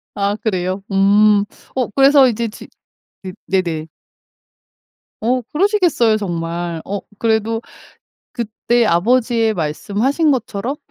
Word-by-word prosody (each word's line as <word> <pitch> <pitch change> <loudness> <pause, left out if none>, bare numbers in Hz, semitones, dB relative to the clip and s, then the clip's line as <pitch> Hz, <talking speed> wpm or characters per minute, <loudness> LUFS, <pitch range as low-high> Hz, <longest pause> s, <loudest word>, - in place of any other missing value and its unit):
아 200 +1 0
그래요? 185 -2 -2
음 205 +1 +4 0.3
어 255 -3 0
그래서 275 0 +6
이제 235 -1 -1
지 210 - -12 0.6
네 185 -1 -7
네네. 170 -5 -1 1.4
어 250 +3 +1
그러시겠어요 345 - +2
정말. 170 -3 -4
어 200 +1 -3 0.2
그래도 225 0 0 0.7
그때 235 +1 0
아버지의 225 +4 +2
말씀하신 210 - 0
것처럼 240 +1 -2
215 Hz, 225 characters per minute, -18 LUFS, 190-245 Hz, 1.4 s, 그래서